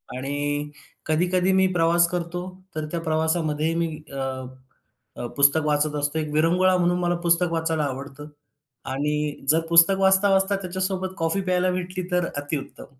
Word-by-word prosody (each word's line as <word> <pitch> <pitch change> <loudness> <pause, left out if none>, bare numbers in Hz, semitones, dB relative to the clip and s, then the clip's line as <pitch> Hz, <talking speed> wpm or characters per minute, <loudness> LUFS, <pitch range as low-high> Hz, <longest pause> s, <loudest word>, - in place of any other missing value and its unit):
आणि 145 +2 -3 0.3
कधी-कधी 180 +4 +1
मी 190 0 +4
प्रवास 170 0 +3
करतो, 175 0 -3 0.3
तर 155 -1 -2
त्या 170 - -2
प्रवासामध्ये 160 -1 0
मी 170 0 0 0.2
अ, 140 - -7 1.0
अ, 120 - -5
पुस्तक 145 +2 +4
वाचत 150 0 +1
असतो. 145 +2 -1
एक 150 -1 -3
विरंगुळा 180 +4 +3
म्हणून 175 0 +1
मला 175 0 +1
पुस्तक 170 0 +2
वाचायला 160 -1 0
आवडतं. 140 +1 -6 0.6
आणि 150 +1 -2
जर 160 - +5
पुस्तक 170 +3 +6
वाचता, 190 +1 +4
वाचता 195 +1 +2
त्याच्यासोबत 185 0 -3
कॉफी 165 +3 0
प्यायला 185 -1 +1
भेटली, 180 0 -4
तर 180 -1 +1
अतिउत्तम. 145 0 -5
165 Hz, 150 wpm, -24 LUFS, 150-180 Hz, 1.0 s, पुस्तक